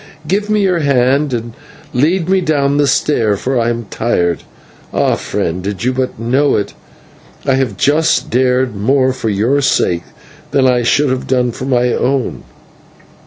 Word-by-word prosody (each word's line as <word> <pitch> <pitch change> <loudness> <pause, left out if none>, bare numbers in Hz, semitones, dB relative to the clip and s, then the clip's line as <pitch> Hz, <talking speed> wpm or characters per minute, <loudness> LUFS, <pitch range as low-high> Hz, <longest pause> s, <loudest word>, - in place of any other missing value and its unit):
Give 205 +5 -1
me 210 -1 +2
your 180 -3 +2
hand 140 0 +2
and 115 -1 -4 0.4
lead 165 +7 +1
me 190 0 +2
down 145 -4 +1
the 145 -1 +3
stair, 115 -6 +1
for 130 +4 -1
I 115 0 +1
am 120 -1 -3
tired. 85 - 0 0.5
Ah, - - +1
friend, 85 +2 -3
did 100 +2 -4
you 130 +1 +1
but 130 0 -2
know 130 +5 +1
it, 100 -1 -2 0.7
I 135 - +2
have 130 -7 -1
just 150 - +1
dared 125 -1 +1
more 130 +6 +2
for 125 -3 -3
your 115 +8 +1
sake 85 -9 +1 0.4
than 135 -2 +2
I 125 -1 +3
should 135 +3 +2
have 130 0 -3
done 125 -2 +1
for 125 - -7
my 125 -2 +1
own." 135 0 -1
130 Hz, 165 wpm, -15 LUFS, 115-145 Hz, 0.7 s, the